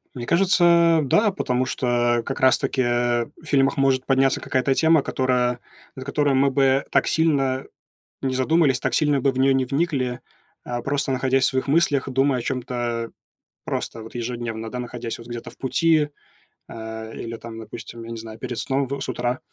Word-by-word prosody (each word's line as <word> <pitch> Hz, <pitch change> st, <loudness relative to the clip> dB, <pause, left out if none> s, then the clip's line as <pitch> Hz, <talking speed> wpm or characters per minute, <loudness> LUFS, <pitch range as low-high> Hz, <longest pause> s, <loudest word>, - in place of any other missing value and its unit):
Мне 120 Hz, -2 st, -5 dB
кажется, 170 Hz, -1 st, +4 dB
да, 205 Hz, -, +3 dB
потому 130 Hz, -8 st, -1 dB
что, 120 Hz, -2 st, +1 dB
как 135 Hz, -, -4 dB
раз 130 Hz, 0 st, +5 dB
таки, 135 Hz, -1 st, -1 dB
э, 120 Hz, -1 st, +1 dB
в 160 Hz, -, -17 dB
фильмах 140 Hz, +1 st, +2 dB
может 135 Hz, -1 st, +2 dB
подняться 135 Hz, 0 st, +2 dB
какая-то 130 Hz, +1 st, 0 dB
тема, 160 Hz, 0 st, +4 dB
которая 125 Hz, -2 st, 0 dB, 0.4 s
над 130 Hz, 0 st, -8 dB
которой 145 Hz, 0 st, +1 dB
мы 135 Hz, +1 st, +3 dB
бы 135 Hz, 0 st, +3 dB
так -, -, +2 dB
сильно 135 Hz, -5 st, +1 dB, 0.6 s
не 130 Hz, -1 st, -1 dB
задумались. 135 Hz, 0 st, +2 dB
ак -, -, 0 dB
сильно 145 Hz, -3 st, +2 dB
бы 135 Hz, +1 st, +2 dB
в -, -, -6 dB
неё 135 Hz, +1 st, +4 dB
не 130 Hz, -1 st, +1 dB
вникли, 135 Hz, -4 st, -1 dB, 0.4 s
а, 120 Hz, 0 st, -4 dB
просто 140 Hz, -1 st, 0 dB
находясь 130 Hz, 0 st, +1 dB
в -, -, +4 dB
своих 130 Hz, +1 st, -2 dB
мыслях, 145 Hz, -3 st, +2 dB
думая 135 Hz, 0 st, +2 dB
о -, -, -4 dB
чём-то 120 Hz, -2 st, -3 dB, 0.5 s
просто 115 Hz, -, -4 dB
вот 110 Hz, -, -12 dB
ежедневно, 120 Hz, -2 st, -4 dB
да, 125 Hz, -, -5 dB
находясь 120 Hz, -1 st, -5 dB
вот 115 Hz, -, -11 dB
где-то 120 Hz, -1 st, -7 dB
в -, -, -21 dB
пути, 150 Hz, +3 st, +2 dB, 0.6 s
а, 110 Hz, 0 st, -7 dB
или 115 Hz, 0 st, -6 dB
там, 115 Hz, -1 st, -9 dB
допустим, 115 Hz, +1 st, -9 dB
я 115 Hz, -, -9 dB
не 115 Hz, -, -5 dB
знаю, 110 Hz, 0 st, -9 dB
перед 120 Hz, -1 st, -5 dB
сном, 135 Hz, 0 st, 0 dB
в 140 Hz, +1 st, -4 dB
с -, -, -3 dB
утра, 120 Hz, +1 st, -2 dB
130 Hz, 185 wpm, -23 LUFS, 120-140 Hz, 0.6 s, раз